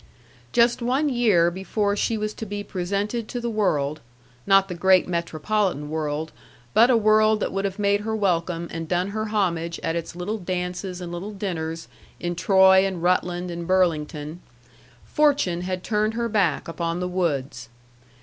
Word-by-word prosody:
Just 235 +1 +3
one 265 +5 +1
year 210 -10 +3
before 200 +3 -1
she 220 +2 0
was 215 0 -3
to 220 - -7
be 205 +1 -4
presented 200 +5 -3
to 245 - -4
the 235 -1 -3
world 155 -9 0 0.5
not 195 -1 +5
the 180 - -5
great 185 +1 +4
metropolitan 170 -1 -1
world, 155 0 -2 0.4
but 235 +3 +6
a 245 - +5
world 215 0 +4
that - - -2
would 195 +1 -1
have 195 0 -3
made 205 -1 +2
her 220 +1 -2
welcome 170 -4 0
and 165 0 -5
done 180 +2 0
her 215 +1 -3
homage 170 -6 -1
at 165 - -1
its 170 0 -4
little 200 +5 -3
dances 180 0 -4
and 175 -1 -6
little 185 +5 -6
dinners 165 -5 -4 0.3
in 175 0 -2
Troy 190 +1 +5
and 190 -3 -3
Rutland 180 0 0
and 170 0 -6
Burlington 160 -3 0 0.7
fortune 285 - +2
had 185 0 -4
turned 215 0 0
her 235 0 -1
back 200 -8 +1
upon 170 0 -3
the 180 - -2
Woods. 140 -10 -2
185 Hz, 170 wpm, -24 LUFS, 170-210 Hz, 0.7 s, but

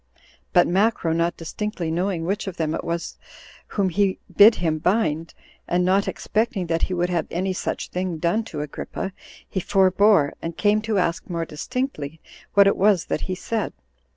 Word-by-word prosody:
But 175 - +5
Macro, 190 -3 +2
not 170 +1 0
distinctly 175 0 -4
knowing 175 0 -1
which 200 +3 -2
of 185 -2 -5
them 155 -1 -1
it - - -3
was 170 0 -4 0.5
whom 195 -3 0
he 195 +1 +1 0.2
bid 215 +3 +8
him 160 -3 -1
bind, 165 -4 0 0.3
and 180 +1 +1
not 195 +2 +2
expecting 220 -3 -1
that 165 -1 -1
he 185 - 0
would 175 +1 0
have 170 - 0
any 185 +2 -1
such - - -3
thing 180 -2 -2
done 175 +7 +1
to 155 -9 -5
Agrippa, 150 +5 -5 0.3
he 190 - -2
forbore, 190 -3 +4
and 165 0 -5
came 210 0 +3
to 215 -1 -1
ask 175 -1 -1
more 170 -1 -2
distinctly 160 - -4 0.4
what 200 0 +8
it 200 - +3
was 195 -2 +3
that - - -1
he 185 - -1
said. 220 +3 -3
180 Hz, 180 wpm, -23 LUFS, 165-200 Hz, 0.5 s, bid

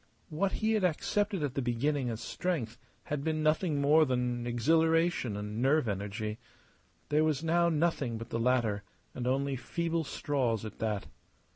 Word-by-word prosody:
What 190 +5 0
he 220 0 0
had 215 -3 +1
accepted 195 +2 0
at 140 -3 -1
the 135 - -1
beginning 125 +2 0
as 115 -1 -4
strength 140 -12 -3 0.2
had 145 -1 -3
been 155 0 0
nothing 155 0 +2
more 150 +3 +5
than 125 -3 -1
exhilaration 160 -1 +2
and 105 +2 -4
nerve 135 0 +3
energy. 105 +2 -3 0.7
There 150 +1 +3
was 155 -1 +1
now 170 +1 +3
nothing 150 -7 0
but 115 +1 -8
the 115 - -1
latter, 115 -4 +1 0.3
and 125 -1 -4
only 135 +1 +1
feeble 165 +6 -2
straws 130 -8 -1
at 110 - -8
that. 105 -3 -1
140 Hz, 160 wpm, -31 LUFS, 115-160 Hz, 0.7 s, more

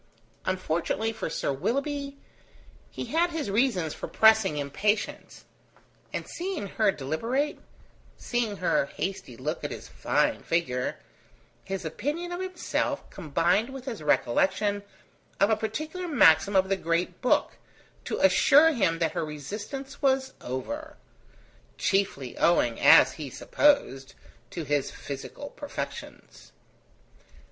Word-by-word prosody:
Unfortunately 185 +4 -1
for 220 -6 -4
Sir 140 - -1
Willoughby, 280 - -2 0.7
he - - -6
had 340 +2 +1
his 320 -11 -3
reasons 200 - +1
for - - -6
pressing 220 -7 +4
impatience; 200 +9 -2 0.7
and - - -4
seeing 355 - -4
her 205 +1 +2
deliberate, 230 - -2 0.6
seeing 235 -4 -2
her 180 -6 +1
hasty 165 -11 -5
look 150 +6 -4
at - - -2
his - - -8
fine - - 0
figure, 125 -7 -1 0.7
his 190 -2 -4
opinion 300 - -3
of 350 - -4
himself 370 -1 -2
combined 175 - +1
with 265 -1 -8
his 235 - -5
recollection 190 - +1 0.6
of 200 +3 +4
a - - +5
particular 310 - -4
maxim 200 - +5
of 190 0 +4
the 195 0 +1
Great 170 0 -1
Book 250 - +1 0.4
to - - -3
assure 285 - +6
him 190 - +1
that 165 -2 0
her - - -2
resistance 210 - -7
was 265 -1 +2
over: 290 - -5 0.8
chiefly 185 -10 0
owing, 120 -9 +3
as - - +7
he 150 -4 -7
supposed, 135 - +1 0.3
to 170 - -5
his 145 -1 0
physical 140 - -8
perfections. 290 -1 -8
200 Hz, 120 wpm, -27 LUFS, -, 0.8 s, as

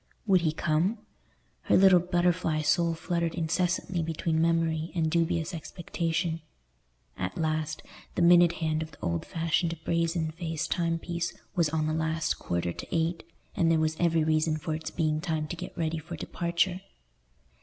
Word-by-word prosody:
Would 190 -4 +4
he 160 -2 +2
come? 165 +7 +1 0.7
Her - - +4
little 190 -1 +7
butterfly 175 -3 +1
soul 165 +2 +2
fluttered 170 0 -1
incessantly 175 +2 0
between 160 0 -1
memory 165 -1 +1
and 160 -2 +1
dubious 170 +1 0
expectation. 165 0 -2 0.8
At 90 - -3
last 155 -1 -1 0.3
the 175 - +2
minute 175 0 +7
hand 155 -1 -1
of 160 - -4
the - - -18
old 85 -1 -1
fashioned 165 +1 0
brazen 165 -1 0
faced 160 -1 -4
timepiece 170 0 -1 0.2
was 170 -4 +3
on 155 0 0
the 155 - 0
last 160 0 -1
quarter 85 0 -2
to - - -8
eight, 165 +1 0 0.3
and 165 - +3
there 165 - +4
was 155 0 +1
every 165 -2 +3
reason 155 0 +2
for 155 +1 -3
its 155 +1 -4
being 155 -2 0
time 155 -2 -2
to - - -3
get - - -8
ready 160 -1 -1
for 170 +3 -7
departure. 175 +3 -1
165 Hz, 160 wpm, -28 LUFS, 155-170 Hz, 0.8 s, little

